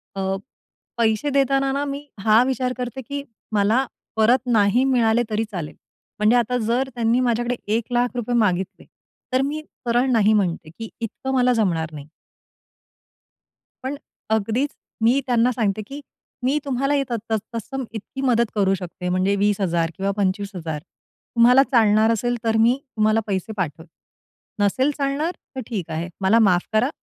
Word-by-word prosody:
अ, - - -4 0.8
पैसे 225 +4 +1
देताना 275 -1 +2
ना 280 +1 -1
मी 280 +1 -5 0.2
हा 220 +2 +6
विचार 255 -1 -1
करते 250 +1 -4
की 280 0 -3 0.3
मला 215 +5 +2 0.3
परत 225 +4 +4
नाही 225 +1 +3
मिळाले 235 -1 +3
तरी 215 +1 0
चालेल 170 -6 -5 0.4
म्हणजे 215 +3 +4
आता 245 +1 +1
जर 255 +3 +1
त्यांनी 235 +1 +2
माझ्याकडे 240 0 +1 0.2
₹1,00,000 240 +1 -1
मागितले 190 -4 0 0.5
तर 255 - +3
मी 300 +2 -3 0.3
सरळ 240 +3 +2
नाही 220 -2 +4
म्हणते 175 -6 0
की 225 -1 -6
इतकं 245 +3 -4
मला 250 -1 +3
जमणार 170 -8 0
नाही. 145 -1 -9 1.8
पण 265 +2 -3 0.3
अगदीच, 220 +6 +1 0.3
मी 235 +5 +4
त्यांना 245 0 +3
सांगते, 215 -4 -1
की 280 +2 -8 0.4
मी 265 +4 +2
तुम्हाला 275 +1 0
हे 280 -1 +2
त - - -2 0.2
त - - 0 0.2
तत्सम 260 +4 -4
इतकी 225 +4 -7
मदत 235 -4 +2
करू 195 -2 +3
शकते. 180 0 -6
म्हणजे 185 +2 +1
20,000 190 -5 +1
किंवा 195 +1 0
25,000 190 -5 -2
तुम्हाला 245 - +2
चालणार 220 -2 +4
असेल, 240 +2 0
तर 225 -1 +2
मी 235 +3 +4 0.2
तुम्हाला 215 0 +3
पैसे 195 +1 -2
पाठवते. 165 -2 -3 0.8
नसेल 260 +8 +2
चालणार, 285 +4 0 0.2
तर 260 - -3
ठीक 195 -8 -4
आहे, 165 +2 -3
मला 195 +4 +4
माफ 180 -1 +1
करा, 220 +5 +3
230 Hz, 150 wpm, -22 LUFS, 200-255 Hz, 1.8 s, हा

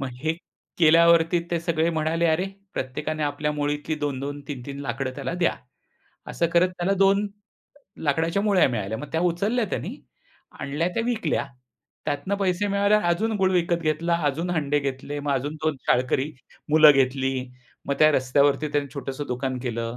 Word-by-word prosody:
मग 135 - -2
हे 160 +1 +1 0.5
केल्यावरती 165 +1 +5
ते 170 - +1
सगळे 165 -1 0
म्हणाले, 160 +1 0
"अरे, 160 +3 +2 0.3
प्रत्येकाने 150 +4 -3
आपल्या 150 +1 -1
मुळीतली 145 +1 -2
2-2, 145 0 -3
3-3 140 0 -6
लाकडं 135 0 -3
त्याला 140 +4 -3
द्या." - - +3 0.8
असं 170 - 0
करत 175 +2 +4
त्याला 180 +3 +1
2 195 +1 +4 0.8
लाकडाच्या 165 +6 +1
मुळ्या 200 -8 +4
मिळाल्या. 110 -2 -3
मग 150 - -7
त्या 160 - +1
उचलल्या 215 +8 0
त्यांनी - - -3 0.7
आणल्या 150 +5 -1
त्या 230 - 0
विकल्या, 220 -12 0 0.6
त्यातनं 155 +7 -1
पैसे 185 +2 +1
मिळाल्यावर 200 0 +2
अजून 215 +6 +1
गूळ 190 -1 +2
विकत 170 -1 +1
घेतला, 165 +2 +1
अजून 165 +6 -3
हंडे 145 -4 +1
घेतले 140 +1 -4
मग 145 -1 -1
अजून 140 +3 -2
2 155 -3 +1
शाळकरी 130 +4 +1 0.4
मुलं 155 -1 +8
घेतली. 135 0 0 0.5
मग 140 - 0
त्या 155 0 +6
रस्त्यावरती 140 +3 +2
त्यांनी 145 -1 0
छोटंसं 140 0 -5
दुकान 125 +1 -2
केलं. 115 0 -3
155 Hz, 155 wpm, -24 LUFS, 140-170 Hz, 0.8 s, मुलं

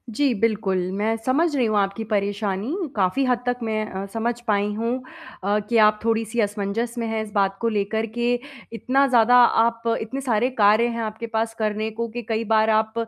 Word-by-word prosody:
जी 280 -4 +2
बिल्कुल, 210 -4 +1
मैं 215 +3 0
समझ 295 +4 +2
रही 250 -3 +2
हूँ 215 -1 +1
आपकी 200 +2 0
परेशानी 205 - -1 0.2
काफ़ी 200 +8 +1
हद 250 -1 +1
तक 245 0 0
मैं 215 -1 -1
अ, 190 +1 -4
समझ 230 +2 0
पाई 205 0 +1
हूँ 230 +2 -2 0.5
अ, 205 +2 +1
कि 235 - +2
आप 210 0 +2
थोड़ी-सी 225 0 -1
असमंजस 205 +3 -2
में 230 - -2
हैं 220 0 -2
इस 210 - -10
बात 195 -1 +1
को 230 - +1
लेकर 215 +1 -1
के 240 +1 +1 0.4
इतना 270 +4 +2
ज़्यादा 245 -1 +4
आप 230 -1 +4 0.2
इतने 260 +5 -5
सारे 245 -1 +1
कार्य 210 +3 +5
हैं 230 -1 -3
आपके 220 +2 -5
पास 225 0 -2
करने 215 0 -1
को, 230 +1 -3
कि 240 +2 -6
कई 225 +1 0
बार 220 0 +2
आप 220 0 +2
220 Hz, 195 wpm, -23 LUFS, 210-235 Hz, 0.5 s, कार्य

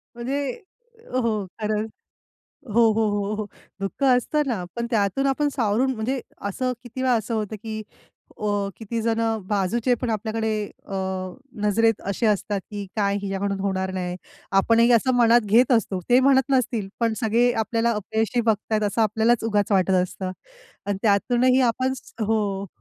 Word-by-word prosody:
म्हणजे 270 +4 -2 0.6
हो. 225 -5 0
खरंच. 215 +1 -1 0.8
हो, 235 - +5
हो, 225 -1 +2
हो, 205 0 -1
हो. 215 0 -3 0.4
दुःख 195 +8 -3
असतं 265 +4 +3
ना 215 -8 -1
पण 235 0 -2
त्यातून 220 +6 +1
आपण 290 +2 +1
सावरून 245 +2 +1
म्हणजे 245 +4 -2 0.3
असं 255 +5 -1
किती 250 +2 -7
वेळा 255 -1 +3
असं 225 +1 -2
होतं 215 0 -3
की 220 -1 -4 0.6
अ, 210 - -3 0.3
किती 225 +1 -4
जणं 225 -1 0
बाजूचे 220 +5 +1
पण 245 - -1
आपल्याकडे 220 +1 -1 0.4
अ, 195 - -7 0.7
नजरेत 225 +1 +2
असे 225 +4 -1
असतात 205 -1 0
की 205 -1 -5
काय 200 -1 +1
हिच्याकडून 195 0 -2
होणार 190 -1 -1
नाही. 180 -1 -3 0.5
आपणही 230 +3 +4
असं 250 +2 +4
मनात 240 0 +5
घेत 250 +2 +6
असतो 200 -5 +2
ते 250 +1 +6
म्हणत 265 0 +4
नसतील 235 -6 +1
पण 230 -1 +1
सगळे 235 +2 +3
आपल्याला 230 +2 0
अपयशी 220 +3 -1
बघतायेत 215 -1 0
असं 225 +3 0
आपल्यालाच 220 +2 +2
उगाच 210 -2 +1
वाटत 190 -1 +3
असतं 185 0 -5 0.6
आणि 200 -1 -1
त्यातूनही 245 +5 +3
आपण 260 +3 -1 0.3
हो. 200 -2 0
220 Hz, 155 wpm, -24 LUFS, 205-240 Hz, 0.8 s, घेत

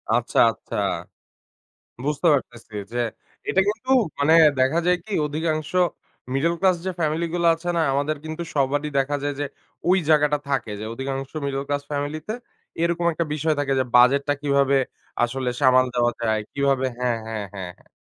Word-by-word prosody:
আচ্ছা, - - 0
আচ্ছা - - -9 1.3
বুঝতে 150 +3 0
পারতেছি 120 -5 -4 0.2
যে - - -2 0.5
এটা - - +3
কিন্তু 220 +5 -2 0.3
মানে 145 +3 +4 0.3
দেখা 130 +6 +3
যায় 180 0 +4
কি 215 - -6
অধিকাংশ 155 0 -2 0.6
মিডল 165 +6 +2
ক্লাস 190 -2 +4
যে 190 - 0
ফ্যামিলি 160 +1 0
গুলো 170 -1 +2
আছে 175 +2 -5
না? - - +3
আমাদের 145 +2 0
কিন্তু 160 +1 -5
সবারই 145 +2 +1
দেখা 135 +2 +1
যায় 145 0 -1
যে 145 - 0 0.4
ওই 185 - +5
জায়গাটা 150 -1 +4
থাকে 130 -6 -1
যে - - -5
অধিকাংশ 135 +2 -4 0.2
মিডল 135 0 -2
ক্লাস 145 0 -1
ফ্যামিলি 145 +1 -2
তে 215 - -2 0.5
এরকম 170 0 +1
একটা 170 +2 -1
বিষয় 155 +1 0
থাকে 140 -1 0
যে - - +3
বাজেটটা 140 +4 +5
কিভাবে 140 -1 +3 0.5
আসলে 125 +1 -1
সামাল 130 -1 +5
দেওয়া 120 0 +3
যায়। 110 -2 +1
কিভাবে 140 -1 +1
হ্যাঁ, 125 -2 0
হ্যাঁ, 110 -2 -4
হ্যাঁ, 95 -2 -5
হ্যাঁ। - - -26
145 Hz, 165 wpm, -23 LUFS, 130-155 Hz, 1.3 s, ওই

